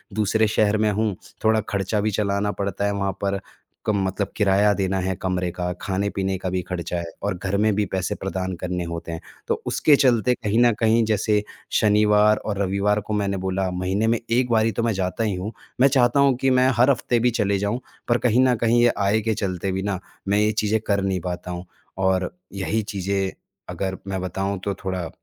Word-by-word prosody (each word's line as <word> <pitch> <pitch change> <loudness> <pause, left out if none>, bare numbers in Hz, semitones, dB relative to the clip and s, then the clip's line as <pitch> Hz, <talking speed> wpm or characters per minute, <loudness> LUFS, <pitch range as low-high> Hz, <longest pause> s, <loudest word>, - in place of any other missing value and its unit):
दूसरे 110 +1 +2
शहर 105 0 +2
में - - +2
हूँ 105 -1 0 0.3
थोड़ा 110 0 +3
खर्चा 100 +1 -1
भी 110 +1 0
चलाना 100 0 0
पड़ता 100 0 -1
है 100 - +1
वहाँ 100 -1 -1
पर 100 0 +1 0.5
क - - +2
मतलब 95 0 -1
किराया 105 0 +4
देना 95 -1 -1
है 95 +1 -1
कमरे 90 -1 -1
का, 90 +1 -3
खाने-पीने 95 0 -1
का 95 0 -3
भी 90 0 -1
खर्चा 85 -1 -3
है 85 - -3 0.2
और 100 - 0
घर 95 +2 -2
में 105 0 +3
भी 105 0 +1
पैसे 95 -1 -2
प्रदान 95 -1 -3
करने 90 -1 -2
होते 85 0 -5
हैं। 80 - -5 0.3
तो - - -1
उसके 150 - +4
चलते 125 -3 +3
कहीं 110 -2 0
न 120 - +5
कहीं 115 0 +3
जैसे 105 -1 +1 0.4
शनिवार 105 0 +4
और 105 -2 -4
रविवार 100 +2 +1
को 105 - -5
मैंने 100 -2 0
बोला, 95 0 -1
महीने 95 +4 0
में 115 0 +2
1 125 +1 +2
बार 110 -1 +4
ही 115 - +2
तो 115 +3 -2
मैं 115 -2 +1
जाता 95 +4 -2
ही 105 -3 0
हूँ। 95 +4 -4 0.3
मैं 135 - +8
चाहता 130 -1 +3
हूँ 140 -2 +5
कि 135 - +3
मैं 130 0 +4
हर 125 +3 +5
हफ्ते 120 -1 0
भी 125 +1 +2
चले 100 -3 +1
जाऊँ 105 +5 -1 0.3
पर 120 0 +3
कहीं 125 0 +3
न 125 - +3
कहीं 120 +1 +4
ये 120 - +4
आय 100 +2 +2
के 110 +1 0
चलते 95 -2 -2
भी 95 +1 -2
ना 100 -3 -2 0.3
मैं 100 +1 +3
ये 105 0 +3
चीजें 110 +1 +2
कर 100 -1 +2
नहीं 95 -1 0
पाता 90 0 -4
हूँ 90 +1 -6 0.4
और 95 -1 +1 0.2
यही 100 +3 -1
चीज़ें 95 0 -1 0.4
अगर 95 +1 -3
मैं 95 -1 -2
बताऊँ 95 +2 -2
तो 100 - 0
थोड़ा 90 -3 -2
100 Hz, 215 wpm, -23 LUFS, 95-110 Hz, 0.5 s, मैं